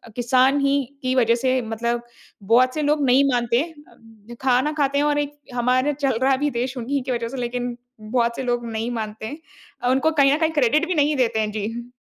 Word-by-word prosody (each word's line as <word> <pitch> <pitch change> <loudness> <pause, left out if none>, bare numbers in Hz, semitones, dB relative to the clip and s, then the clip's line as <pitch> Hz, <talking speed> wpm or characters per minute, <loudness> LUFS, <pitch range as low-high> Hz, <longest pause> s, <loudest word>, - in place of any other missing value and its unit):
किसान 255 +3 +3
ही 280 0 +2 0.2
की 255 - 0
वज़ह 235 -2 +3
से 255 +1 0
मतलब 235 +1 -2 0.4
बहुत 250 +5 +4
से 305 - -1
लोग 295 0 +1
नहीं 260 +2 +5
मानते 240 -1 +1
हैं, 325 +2 -3 0.2
उम 225 +1 -15
खाना 260 +3 +2
खाते 280 -2 0
हैं 290 - +2
और 295 0 +1
एक 290 0 -4 0.2
हमारा 255 +3 +2
चल 270 -4 -1
रहा 270 0 +4
भी 295 +2 0
देश 250 +2 -3
उन्हीं 265 +3 -2
की 260 - -4
वजह 235 -1 -2
से 270 - -7
लेकिन 245 0 -3 0.2
बहुत 235 +1 0
से 265 - -4
लोग 240 -1 -1
नहीं 225 +2 -3
मानते 220 -2 -5
हैं 290 +8 -7 0.4
अ, 245 - +2
उनको 270 +5 +2
कहीं 280 -3 +4
न 295 - +2
कहीं 320 -1 +1
क्रेडिट 300 +3 +2
भी 365 - -1
नहीं 295 0 +2
देते 230 -3 +1
हैं। 215 -1 -1
जी। 230 +4 -5
255 Hz, 225 wpm, -22 LUFS, 235-280 Hz, 0.4 s, नहीं